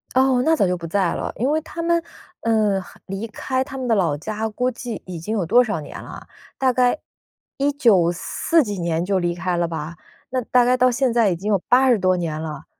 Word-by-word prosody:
哦， 260 -1 +4
那 320 +2 +3
早 200 - +2
就 180 - 0
不 170 -1 -7
在 185 0 +1
了。 - - -3
因 255 +6 0
为 310 - +2
他 335 +2 -7
们， 335 0 +2 0.4
呃， 215 -4 +2
很 - - -16
离 195 +4 -5
开 260 +4 -2
他 270 0 -8
们 255 -1 -3
的 230 - +3
老 170 -7 +1
家 215 +7 -3
估 250 +4 -1
计 240 -1 -6
已 180 -2 -6
经 210 +7 -3
有 185 - 0
多 245 +9 +5
少 215 -8 -2
年 - - -9
啦？ - - -10 0.3
大 260 -1 +2
概 250 +3 +2 0.6
194 270 - +2
几 205 -5 -4
年 170 -1 -1
就 195 0 +1
离 175 -1 -1
开 180 0 -2
了 170 0 +1
吧， 160 0 -6 0.3
那 255 0 -1
大 250 +1 +3
概 250 - +4
到 255 0 +4
现 250 0 +1
在 230 -3 +4
已 180 - 0
经 195 +5 -4
有 200 - +3
80 250 -3 +5
多 185 0 +2
年 160 -3 -3
了。 155 -3 -6
215 Hz, 235 characters per minute, -22 LUFS, 175-255 Hz, 0.6 s, 多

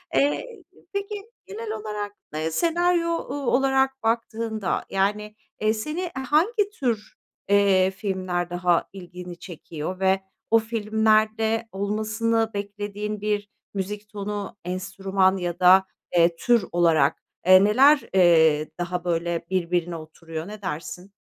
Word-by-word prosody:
Eee, 290 - +2 0.5
peki, 400 +1 -3 0.3
genel 215 +3 -6
olarak, 210 -1 -4 0.2
ııı, 160 +1 -1
senaryo, 345 - +2
ooo, 285 -4 -3
olarak 265 -1 +1
baktığında, 225 -2 -1
yani, 210 +2 -1 0.3
eee, 215 +1 +3
seni, 305 +10 -4
eee, 355 -2 -4 0.2
hangi 400 +7 +3
tür, 225 -5 -2 0.3
eee, 195 -2 +4
filmler 185 -3 -2
daha 175 -1 +1
ilgini 180 -1 -9
çekiyor 170 0 -7
ve 190 0 +2 0.3
o 225 - +7
filmlerde 220 0 +1
olmasını 220 +3 0
beklediğin 205 +1 -4
bir 205 -1 -1 0.2
müzik 205 +2 -4
tonu, 205 -1 -5
enstrüman 190 +1 0
ya 175 -1 -3
da, 185 +1 +7 0.3
eee, 170 0 +4
tür 235 +1 +2
olarak, 165 -5 +3 0.2
eee, 185 +1 +8
neler, 270 +8 +6
eee, 160 -4 +5
daha 175 0 -2
böyle 170 -1 -1
birbirine 175 -2 0
oturuyor, 160 +1 -8
ne 210 0 -9
dersin? 180 +2 -6
200 Hz, 120 wpm, -24 LUFS, 180-225 Hz, 0.5 s, eee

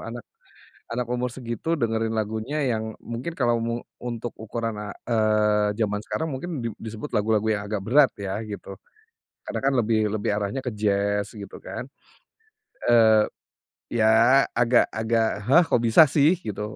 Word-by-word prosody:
anak 120 0 -7 0.6
anak 120 +2 -2
umur 125 0 -1
segitu 125 +6 -3
dengerin 115 -4 -1
lagunya 110 +7 -2
yang 110 -4 -2
mungkin 120 +8 -5
kalau 120 -6 +1
mu 115 0 -2 0.2
untuk 120 -1 -5
ukuran 115 0 -4
a 105 -1 -6 0.2
eee, 105 -2 +3
zaman 105 -1 0
sekarang 160 - -2
mungkin 140 0 -4
di - - 0
disebut 110 +5 -7
lagu-lagu 110 -1 +1
yang 100 -1 -1
agak 105 -1 -3
berat 135 +5 +5
ya 100 0 -4
gitu, 100 -2 -8 0.7
karena - - -3
kan 135 - +3
lebih 110 -2 +1
lebih 105 -1 -2
arahnya 105 +5 -2
ke 130 - -3
jazz 100 -1 0
gitu 100 -3 -9
kan, 125 - -6 1.0
eee, 110 -2 +6 0.7
ya 115 +5 +5
agak 120 0 +4
agak, 110 0 +1 0.2
hah, 170 +7 +6
kok 135 - +2
bisa 115 +7 +7
sih 150 +5 +3
gitu 105 - -6
115 Hz, 155 wpm, -24 LUFS, 105-125 Hz, 1.0 s, bisa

